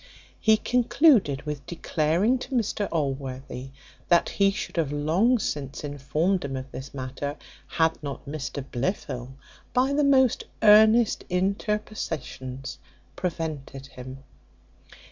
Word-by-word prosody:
He 220 Hz, 0 st, +5 dB
concluded 245 Hz, -, +3 dB
with 150 Hz, -2 st, -5 dB
declaring 175 Hz, +8 st, +1 dB
to 260 Hz, -, -5 dB
Mr 210 Hz, -3 st, 0 dB
Allworthy, 135 Hz, -3 st, -3 dB, 0.4 s
that 170 Hz, -1 st, +4 dB
he 200 Hz, -1 st, +3 dB
should 195 Hz, -2 st, -5 dB
have 155 Hz, -4 st, +1 dB
long 165 Hz, +12 st, +2 dB
since 145 Hz, -, -4 dB
informed 150 Hz, +6 st, 0 dB
him 135 Hz, -1 st, -4 dB
of 130 Hz, 0 st, -6 dB
this 130 Hz, +2 st, -7 dB
matter, 140 Hz, +2 st, -5 dB, 0.3 s
had 160 Hz, -2 st, +1 dB
not 140 Hz, -2 st, -6 dB
Mr 140 Hz, -1 st, -5 dB
Blifil, 125 Hz, -3 st, -3 dB, 0.4 s
by 260 Hz, +3 st, +3 dB
the 295 Hz, +1 st, +2 dB
most 265 Hz, -3 st, +4 dB, 0.2 s
earnest 220 Hz, +2 st, +6 dB
interpositions, 180 Hz, -, -3 dB, 0.4 s
prevented 155 Hz, -6 st, -4 dB
him. 130 Hz, 0 st, -10 dB
155 Hz, 115 wpm, -26 LUFS, 135-210 Hz, 0.4 s, earnest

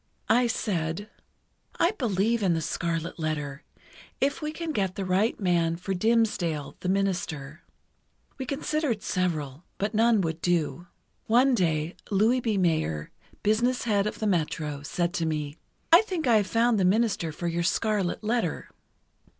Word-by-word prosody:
I 245 Hz, +1 st, +4 dB
said: 200 Hz, -4 st, -2 dB, 0.7 s
"I 340 Hz, -, +4 dB
believe 230 Hz, -, 0 dB
in 180 Hz, -4 st, +2 dB
'The 160 Hz, -, -1 dB
Scarlet 165 Hz, 0 st, -2 dB
Letter,' 150 Hz, -3 st, -3 dB, 0.6 s
if 280 Hz, +3 st, 0 dB
we 305 Hz, 0 st, -2 dB
can 330 Hz, 0 st, -4 dB
get 195 Hz, -8 st, -1 dB
the 195 Hz, -, -3 dB
right 190 Hz, +5 st, +1 dB
man 170 Hz, -4 st, +2 dB
for 180 Hz, +3 st, -3 dB
Dimmesdale, 185 Hz, -8 st, +1 dB
the 180 Hz, -, -3 dB
minister." 175 Hz, -6 st, -2 dB, 0.8 s
We 260 Hz, -, -4 dB
considered 285 Hz, -5 st, -1 dB
several, 155 Hz, -5 st, -2 dB
but 205 Hz, +3 st, -2 dB
none 225 Hz, -1 st, +4 dB
would 165 Hz, -1 st, -3 dB
do. 175 Hz, 0 st, 0 dB, 0.4 s
"One 250 Hz, +4 st, +4 dB
day, 165 Hz, -5 st, 0 dB
Louis 220 Hz, +5 st, +3 dB
B. 225 Hz, -4 st, 0 dB
Mayer, 160 Hz, -, 0 dB, 0.3 s
business 235 Hz, +4 st, +2 dB
head 205 Hz, -3 st, +1 dB
of -, -, -4 dB
the 220 Hz, -, -3 dB
Metro, 155 Hz, -6 st, -1 dB
said 170 Hz, +4 st, -2 dB
to 165 Hz, -, -1 dB
me: 150 Hz, -1 st, -3 dB, 0.3 s
'I 335 Hz, +3 st, +9 dB
think 365 Hz, -7 st, -3 dB
I 235 Hz, -3 st, +5 dB
have 205 Hz, -2 st, +1 dB
found 230 Hz, 0 st, +2 dB
the -, -, +2 dB
minister 195 Hz, -3 st, +2 dB
for 170 Hz, +3 st, -4 dB
your 170 Hz, 0 st, -1 dB
"Scarlet 205 Hz, +2 st, 0 dB
Letter." 220 Hz, -6 st, -1 dB
190 Hz, 155 wpm, -27 LUFS, 165-225 Hz, 0.8 s, I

